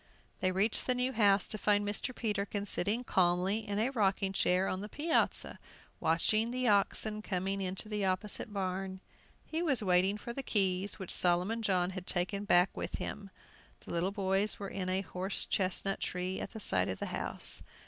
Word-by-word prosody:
They 185 Hz, -, +1 dB
reached 200 Hz, +4 st, +1 dB
the 250 Hz, -, +3 dB
new 250 Hz, +1 st, 0 dB
house 205 Hz, -3 st, +3 dB
to 215 Hz, -, -5 dB
find 205 Hz, 0 st, +2 dB
Mr. 225 Hz, +5 st, -3 dB
Peterkin 205 Hz, -2 st, -2 dB
sitting 205 Hz, +5 st, +1 dB
calmly 185 Hz, 0 st, +2 dB
in 205 Hz, -2 st, -4 dB
a 230 Hz, +5 st, +1 dB
rocking 195 Hz, -5 st, +1 dB
chair 185 Hz, 0 st, +2 dB
on 185 Hz, -, -2 dB
the 210 Hz, -, -6 dB
piazza, 315 Hz, +7 st, +1 dB, 0.4 s
watching 215 Hz, +8 st, +2 dB
the 250 Hz, +1 st, -1 dB
oxen 210 Hz, +1 st, +2 dB
coming 195 Hz, 0 st, -2 dB
into 190 Hz, +2 st, -3 dB
the 210 Hz, -1 st, -2 dB
opposite 195 Hz, +3 st, 0 dB
barn. 190 Hz, -1 st, -3 dB, 0.5 s
He 325 Hz, +1 st, -2 dB
was 275 Hz, -10 st, +2 dB
waiting 190 Hz, +2 st, +3 dB
for 235 Hz, +3 st, -7 dB
the 275 Hz, -, -3 dB
keys, 195 Hz, -5 st, 0 dB
which 190 Hz, -4 st, -3 dB
Solomon 180 Hz, +6 st, +2 dB
John 185 Hz, -4 st, +1 dB
had 185 Hz, -1 st, -7 dB
taken 195 Hz, +3 st, -1 dB
back 180 Hz, -1 st, +4 dB
with -, -, -4 dB
him. 200 Hz, -2 st, -5 dB, 0.6 s
The -, -, -8 dB
little 170 Hz, +2 st, 0 dB
boys 195 Hz, +1 st, 0 dB
were 200 Hz, -1 st, -6 dB
in 185 Hz, -1 st, -3 dB
a 185 Hz, +1 st, +1 dB
horse 190 Hz, +1 st, -3 dB
chestnut 195 Hz, +1 st, 0 dB
tree, 180 Hz, +1 st, -3 dB
at -, -, -5 dB
the 220 Hz, -, -6 dB
side 95 Hz, -, +3 dB
of 95 Hz, -, -3 dB
the -, -, -4 dB
house. -, -, -1 dB
195 Hz, 185 wpm, -32 LUFS, 185-215 Hz, 0.6 s, back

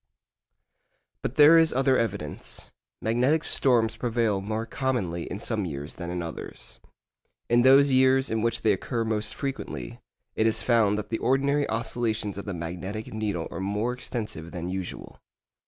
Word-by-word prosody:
But 125 Hz, -, -3 dB
there 155 Hz, +3 st, +8 dB
is 160 Hz, -1 st, +4 dB
other 135 Hz, 0 st, +3 dB
evidence. 100 Hz, -11 st, -3 dB, 0.3 s
Magnetic 125 Hz, +8 st, +2 dB
storms 120 Hz, -4 st, +2 dB
prevail 115 Hz, -4 st, 0 dB
more 110 Hz, +3 st, -3 dB
commonly 110 Hz, -12 st, -2 dB
in 100 Hz, -, -4 dB
some 110 Hz, 0 st, -2 dB
years 75 Hz, -3 st, -5 dB
than 85 Hz, -1 st, -6 dB
in 90 Hz, 0 st, -3 dB
others. 85 Hz, -, -7 dB, 0.7 s
In 120 Hz, +1 st, +5 dB
those 135 Hz, +2 st, +6 dB
years 130 Hz, 0 st, +4 dB
in 110 Hz, 0 st, 0 dB
which 115 Hz, +1 st, 0 dB
they 110 Hz, -, +4 dB
occur 115 Hz, +4 st, -2 dB
most 110 Hz, -1 st, -2 dB
frequently, 80 Hz, -, -5 dB, 0.4 s
it 110 Hz, -, +2 dB
is 110 Hz, 0 st, 0 dB
found 110 Hz, -3 st, +3 dB
that 105 Hz, 0 st, -5 dB
the 115 Hz, -, -2 dB
ordinary 140 Hz, +3 st, +1 dB
oscillations 110 Hz, -3 st, -2 dB
of -, -, -7 dB
the 100 Hz, -, -4 dB
magnetic 90 Hz, +7 st, -5 dB
needle 105 Hz, -6 st, -2 dB
are -, -, -5 dB
more 105 Hz, +5 st, -1 dB
extensive 110 Hz, -9 st, -5 dB
than 85 Hz, 0 st, -5 dB
usual. 95 Hz, -1 st, -6 dB
110 Hz, 155 wpm, -26 LUFS, 95-125 Hz, 0.7 s, there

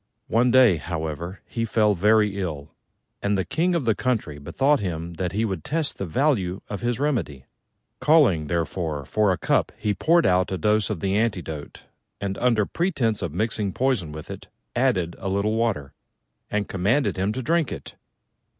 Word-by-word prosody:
One 120 Hz, +3 st, +3 dB
day, 125 Hz, -7 st, +6 dB
however, 80 Hz, +3 st, -5 dB
he 115 Hz, -, -3 dB
fell 110 Hz, -2 st, +2 dB
very 105 Hz, +1 st, +3 dB
ill; 75 Hz, -4 st, -5 dB, 0.5 s
and 100 Hz, 0 st, +1 dB
the 95 Hz, -, -1 dB
King 175 Hz, +2 st, +1 dB
of 160 Hz, -7 st, -1 dB
the 115 Hz, -, +3 dB
country 105 Hz, -, -2 dB
bethought 140 Hz, -, +1 dB
him 85 Hz, -3 st, -4 dB
that 90 Hz, -2 st, -1 dB
he 110 Hz, +3 st, +1 dB
would 95 Hz, -7 st, -3 dB
test 155 Hz, 0 st, -1 dB
the 95 Hz, -, -3 dB
value 100 Hz, -, 0 dB
of 100 Hz, -2 st, -5 dB
his 120 Hz, 0 st, -1 dB
remedy. 95 Hz, -, -1 dB, 0.5 s
Calling, 120 Hz, -, +4 dB
therefore, 80 Hz, -2 st, -2 dB
for 105 Hz, +6 st, +2 dB
a 90 Hz, -, 0 dB
cup, -, -, +1 dB
he 105 Hz, -1 st, 0 dB
poured 165 Hz, +8 st, +3 dB
out 90 Hz, +1 st, +2 dB
a 95 Hz, -, -1 dB
dose 105 Hz, +5 st, +2 dB
of 100 Hz, -7 st, -3 dB
the 95 Hz, 0 st, 0 dB
antidote, 90 Hz, -9 st, -2 dB, 0.4 s
and, 100 Hz, -1 st, -3 dB
under 115 Hz, -4 st, +3 dB
pretence 130 Hz, -, 0 dB
of 85 Hz, -4 st, -4 dB
mixing 105 Hz, -1 st, -1 dB
poison 125 Hz, -, 0 dB
with 75 Hz, 0 st, -8 dB
it, -, -, -9 dB, 0.3 s
added 85 Hz, -2 st, +1 dB
a 95 Hz, -, -3 dB
little 100 Hz, +3 st, 0 dB
water, 110 Hz, -12 st, -1 dB, 0.6 s
and 105 Hz, -1 st, -1 dB
commanded 105 Hz, +10 st, +1 dB
him 95 Hz, +2 st, 0 dB
to 130 Hz, -, -4 dB
drink 165 Hz, +1 st, +1 dB
it. -, -, -7 dB
100 Hz, 180 wpm, -24 LUFS, 85-120 Hz, 0.6 s, day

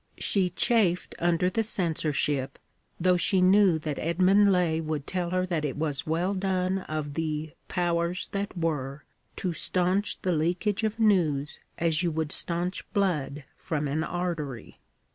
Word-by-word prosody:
She 190 Hz, -3 st, +2 dB
chafed 185 Hz, -1 st, +2 dB
under 175 Hz, +1 st, +2 dB
the 225 Hz, +5 st, 0 dB
censorship, 150 Hz, -9 st, 0 dB, 0.4 s
though 180 Hz, +1 st, +3 dB
she 185 Hz, +2 st, +3 dB
knew 185 Hz, -1 st, +5 dB
that 150 Hz, -2 st, -4 dB
Edmund 185 Hz, +5 st, +4 dB
Laye 170 Hz, -3 st, +1 dB
would 155 Hz, -3 st, -3 dB
tell 180 Hz, -2 st, -2 dB
her 185 Hz, +1 st, 0 dB
that 170 Hz, -4 st, -2 dB
it 145 Hz, -2 st, -3 dB
was 145 Hz, -3 st, -1 dB
well 170 Hz, +5 st, 0 dB
done 190 Hz, -1 st, 0 dB
of 155 Hz, -5 st, -5 dB
the 155 Hz, 0 st, -3 dB, 0.2 s
'Powers 175 Hz, 0 st, -1 dB
that 200 Hz, -1 st, -4 dB
Were' 150 Hz, -4 st, -2 dB, 0.3 s
to 180 Hz, -2 st, -2 dB
stanch 185 Hz, +4 st, 0 dB
the 185 Hz, -, +1 dB
leakage 180 Hz, +6 st, 0 dB
of 220 Hz, +1 st, -1 dB
news 160 Hz, -10 st, +2 dB, 0.2 s
as 165 Hz, 0 st, +1 dB
you 175 Hz, -, +1 dB
would 160 Hz, -1 st, -2 dB
stanch 175 Hz, +2 st, 0 dB
blood 150 Hz, -8 st, -1 dB
from 150 Hz, -2 st, -3 dB
an 150 Hz, +3 st, -1 dB
artery. 165 Hz, -9 st, -4 dB
170 Hz, 150 wpm, -27 LUFS, 155-185 Hz, 0.4 s, knew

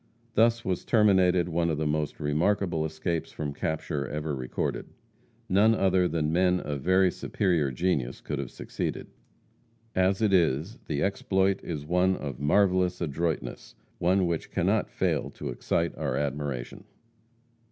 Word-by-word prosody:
Thus 115 Hz, +1 st, +3 dB
was 95 Hz, -2 st, -1 dB
terminated 95 Hz, -5 st, +4 dB
one 85 Hz, 0 st, 0 dB
of 80 Hz, -, 0 dB
the 80 Hz, -, -1 dB
most 75 Hz, 0 st, -1 dB
remarkable 80 Hz, +2 st, +1 dB
escapes 80 Hz, +1 st, -3 dB
from 75 Hz, -2 st, -4 dB
capture 75 Hz, -2 st, -2 dB
ever 75 Hz, +1 st, -3 dB
recorded. 65 Hz, -1 st, -3 dB, 0.6 s
None 105 Hz, +4 st, +4 dB
other 95 Hz, -3 st, +3 dB
than 80 Hz, -1 st, -1 dB
men 90 Hz, +1 st, +3 dB
of 70 Hz, -4 st, -4 dB
very 95 Hz, +3 st, +4 dB
superior 85 Hz, -9 st, 0 dB
genius 65 Hz, -3 st, -1 dB
could 75 Hz, -3 st, -4 dB
have 70 Hz, -3 st, -4 dB
succeeded. -, -, -5 dB, 0.8 s
As 95 Hz, +1 st, +2 dB
it 110 Hz, -3 st, +2 dB
is, 85 Hz, -, +1 dB
the 75 Hz, -2 st, -1 dB
exploit 95 Hz, 0 st, +1 dB
is 75 Hz, -4 st, -5 dB
one 90 Hz, +3 st, +2 dB
of 70 Hz, -6 st, -6 dB
marvelous 90 Hz, +3 st, +2 dB
adroitness, 80 Hz, -5 st, -3 dB, 0.2 s
one 95 Hz, +2 st, +3 dB
which 85 Hz, -2 st, -2 dB
cannot -, -, +1 dB
fail -, -, -1 dB
to -, -, -5 dB
excite 85 Hz, 0 st, -1 dB
our 70 Hz, -4 st, -2 dB
admiration. 70 Hz, -3 st, -3 dB
85 Hz, 140 wpm, -27 LUFS, 75-95 Hz, 0.8 s, terminated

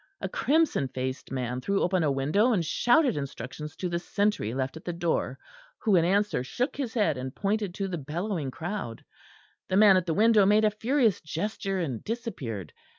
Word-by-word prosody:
A -, -, -3 dB
crimson 300 Hz, -, +1 dB
faced 130 Hz, +1 st, -5 dB
man 125 Hz, -1 st, -2 dB
threw 200 Hz, +7 st, 0 dB
open 180 Hz, 0 st, +2 dB
a 150 Hz, -3 st, +2 dB
window 155 Hz, -, +2 dB
and 175 Hz, -6 st, +1 dB
shouted 250 Hz, -, +3 dB
instructions 140 Hz, +1 st, -6 dB
to 185 Hz, -, -3 dB
the 170 Hz, 0 st, -1 dB
sentry 200 Hz, -, 0 dB
left 130 Hz, +1 st, -2 dB
at 160 Hz, -, -10 dB
the 175 Hz, -, -3 dB
door, 170 Hz, -1 st, -1 dB, 0.4 s
who 215 Hz, -4 st, +2 dB
in 170 Hz, -, +5 dB
answer 200 Hz, -5 st, +1 dB
shook 245 Hz, -, -2 dB
his 260 Hz, -5 st, -4 dB
head 165 Hz, -, +1 dB
and 130 Hz, +1 st, -6 dB
pointed 205 Hz, -2 st, -1 dB
to 195 Hz, -, -2 dB
the 175 Hz, -3 st, -4 dB
bellowing 160 Hz, +1 st, -3 dB
crowd; 165 Hz, -, -5 dB, 0.6 s
the 185 Hz, -, +2 dB
man 205 Hz, -2 st, +7 dB
at 185 Hz, -1 st, -1 dB
the 160 Hz, -, 0 dB
window 220 Hz, 0 st, +5 dB
made 210 Hz, +2 st, +4 dB
a 210 Hz, -, +3 dB
furious 230 Hz, 0 st, +1 dB
gesture 195 Hz, +4 st, -3 dB
and 140 Hz, -, -3 dB
disappeared. 140 Hz, -, -5 dB
180 Hz, 190 wpm, -27 LUFS, 140-210 Hz, 0.6 s, man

